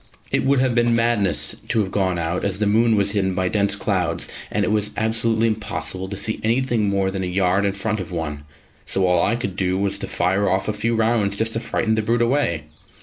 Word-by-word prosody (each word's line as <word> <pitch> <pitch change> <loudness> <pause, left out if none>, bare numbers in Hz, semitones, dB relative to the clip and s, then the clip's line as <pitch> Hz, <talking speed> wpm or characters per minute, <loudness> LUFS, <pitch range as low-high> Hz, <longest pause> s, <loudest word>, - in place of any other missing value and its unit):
It - - +1
would 140 +1 +3
have 130 -1 +2
been 120 0 +2
madness 115 -5 +2
to 115 - 0
have 95 -2 -3
gone 95 -3 0
out, 85 +1 -2
as 95 -2 -1
the 105 - 0
moon 110 +2 +3
was 100 -1 +1
hidden 95 -3 0
by 95 -1 0
dense 100 -1 +2
clouds 95 -4 -1 0.2
and 105 -1 0
it - - -1
was 105 -1 0
absolutely 115 0 +1
impossible 95 -4 -3
to 100 - -4
see 110 +2 -1
anything 115 -2 +1
more 100 -1 0
than 95 0 -3
a - - -2
yard 95 +2 +1
in 100 - 0
front 105 +2 -2
of 95 -1 -6
one; 75 -4 -4 0.4
so 95 - 0
all 90 -1 +3
I 115 - +2
could 120 -6 -4
do 95 -1 0
was 100 0 0
to - - -3
fire 95 +2 +1
off 95 +1 0
a 105 - 0
few 115 +2 -1
rounds 110 -3 +1
just 110 +1 +1
to 115 - -1
frighten 115 -1 -1
the 110 - +1
brute 115 +2 +1
away. 115 - 0
100 Hz, 235 wpm, -21 LUFS, 95-115 Hz, 0.4 s, would